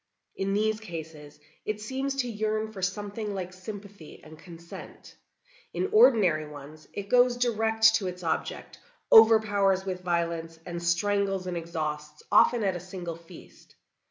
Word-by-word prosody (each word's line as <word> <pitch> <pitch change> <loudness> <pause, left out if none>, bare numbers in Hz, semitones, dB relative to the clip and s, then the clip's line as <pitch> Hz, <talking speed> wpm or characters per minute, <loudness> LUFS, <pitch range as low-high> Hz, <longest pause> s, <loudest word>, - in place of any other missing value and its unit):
In 195 0 -1
these 215 +1 +1
cases 160 -7 -9 0.2
it 215 0 -3
seems 265 +5 -3
to 265 -2 -1
yearn 215 -1 -2
for 195 -3 -9
something 205 +2 -3
like 185 -1 -5
sympathy 200 -2 -10
and 155 0 -13
consent. 170 -1 -12 0.6
In 385 - -1
ordinary 205 - +5
ones 150 +1 -12
it 200 -1 -6
goes 245 +1 +4
direct 225 -2 +3
to 200 -4 -4
its 180 0 -6
object, 165 - -3 0.3
overpowers 205 -4 +6
with 185 -1 -4
violence, 170 -2 -2
and 170 -1 -5
strangles 195 +2 0
and 180 -1 -4
exhausts 150 -3 -5
often 240 -2 +5
at 190 -2 0
a - - -4
single 180 -1 -7
feast. 165 0 -16
195 Hz, 145 wpm, -27 LUFS, 170-215 Hz, 0.6 s, overpowers